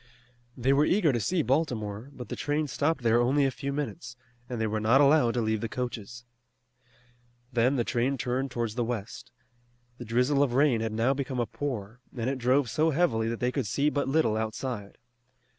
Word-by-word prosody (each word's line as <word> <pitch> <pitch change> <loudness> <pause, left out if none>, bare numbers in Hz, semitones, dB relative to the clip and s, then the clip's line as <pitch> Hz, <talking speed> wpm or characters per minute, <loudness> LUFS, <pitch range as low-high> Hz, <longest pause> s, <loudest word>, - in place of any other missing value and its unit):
They 130 +2 +2
were 140 +2 +4
eager 165 -3 +3
to 120 - 0
see 165 - 0
Baltimore, 120 -4 -1
but 125 -3 -9
the - - -3
train 150 +1 -1
stopped 145 +1 -1
there 115 +1 +4
only 135 +4 +3
a 135 - +1
few 140 +2 -4
minutes, 140 -2 -5 0.3
and 120 -2 -4
they 110 - +1
were 110 0 -1
not 115 +5 +4
allowed 140 -4 +4
to 120 - +1
leave 110 -1 0
the 115 - -3
coaches. 120 -1 -5 1.3
Then 125 +3 +3
the 120 - +1
train 125 +4 0
turned 130 +2 -2
towards 120 -3 -3
the 120 +1 -1
west. 115 -4 -5 0.7
The 120 - -7
drizzle 125 +5 +2
of 130 -4 +1
rain 135 -5 +3
had 110 -1 -2
now 115 +5 +1
become 135 -2 -3
a 120 - +1
pour, 120 -5 -5 0.2
and 115 0 -2
it 135 - -4
drove 130 +2 +2
so 155 +8 +1
heavily 130 -9 +1
that 115 - -3
they 125 0 +1
could 130 -5 -2
see 145 +8 +1
but 145 -1 -1
little 135 -6 +2
outside. 110 -1 -4
125 Hz, 200 wpm, -28 LUFS, 115-140 Hz, 1.3 s, were